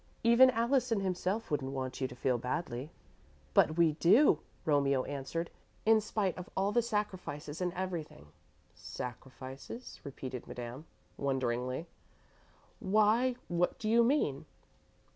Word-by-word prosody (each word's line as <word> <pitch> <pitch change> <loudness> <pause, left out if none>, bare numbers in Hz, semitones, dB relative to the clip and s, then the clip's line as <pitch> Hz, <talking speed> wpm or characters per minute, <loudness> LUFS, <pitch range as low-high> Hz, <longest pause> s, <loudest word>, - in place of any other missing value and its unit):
Even 235 +3 +7
Allison 235 -2 +1
himself 190 +3 -2
wouldn't 135 -2 -1
want 130 0 -4
you 130 - +1
to 125 - -11
feel 125 -1 0
badly." 125 +1 -3 0.6
"But 155 - +4
we 170 -2 +5
do," 170 - +5 0.3
Romeo 140 -3 +3
answered, 145 +5 -4 0.3
"in 220 0 +5
spite 205 -3 -1
of 180 - -8
all 195 +1 +2
the 240 - +3
sacrifices 185 -9 -3
and 180 -1 0
everything." 175 - -5 0.4
"Sacrifices," 130 - -8
repeated 130 -3 -7
Madame, 125 +6 -7 0.3
wonderingly, 130 +1 -1 0.9
"why, 215 +4 +3
what 175 +1 0
do 215 - -4
you 230 +2 +5
mean?" 230 - +1
170 Hz, 125 wpm, -32 LUFS, 135-215 Hz, 0.9 s, Even